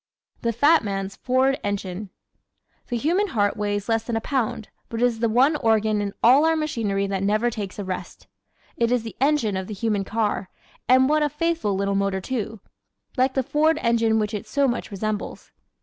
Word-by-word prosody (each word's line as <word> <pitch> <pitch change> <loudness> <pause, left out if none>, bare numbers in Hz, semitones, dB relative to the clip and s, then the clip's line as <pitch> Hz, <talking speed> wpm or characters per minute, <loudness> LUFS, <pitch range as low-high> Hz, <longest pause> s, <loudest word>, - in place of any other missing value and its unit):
The 235 - 0
Fat 290 +7 +4
Man's 195 -1 -3
Ford 260 +2 +1
Engine 200 -1 -4 0.8
¶ - - -37
The 240 - -2
human 345 - +1
heart 205 - 0
weighs 205 -1 -2
less 225 -1 +1
than 235 0 -3
a - - +1
pound 225 -3 -2 0.2
but 230 - -4
it 245 - +4
is 235 -2 0
the 230 0 +1
one 260 +7 +4
organ 220 -4 +2
in 200 -1 -4
all 260 +6 +7
our 325 0 +3
machinery 230 -11 -1
that 195 -1 -2
never 215 +4 +1
takes 205 -4 -6
a 205 - -4
rest. 185 -1 -6 0.5
It 235 0 +1
is 245 -2 +1
the 225 - -8
engine 275 -8 +2
of 190 0 -3
the 210 - -6
human 210 -1 0
car, 210 -2 -2 0.4
and 260 +1 +6
what 305 +1 +2
a 295 - +2
faithful 320 - -1
little 200 +1 0
motor 195 -1 0
too 225 -1 -4 0.5
like 260 0 +1
the 265 - +1
Ford 310 +4 +2
engine 230 -1 +2
which 210 0 -1
it 210 +1 -5
so 280 +4 +1
much 240 -1 -2
resembles. 210 +1 -4
225 Hz, 200 wpm, -23 LUFS, 205-260 Hz, 0.8 s, all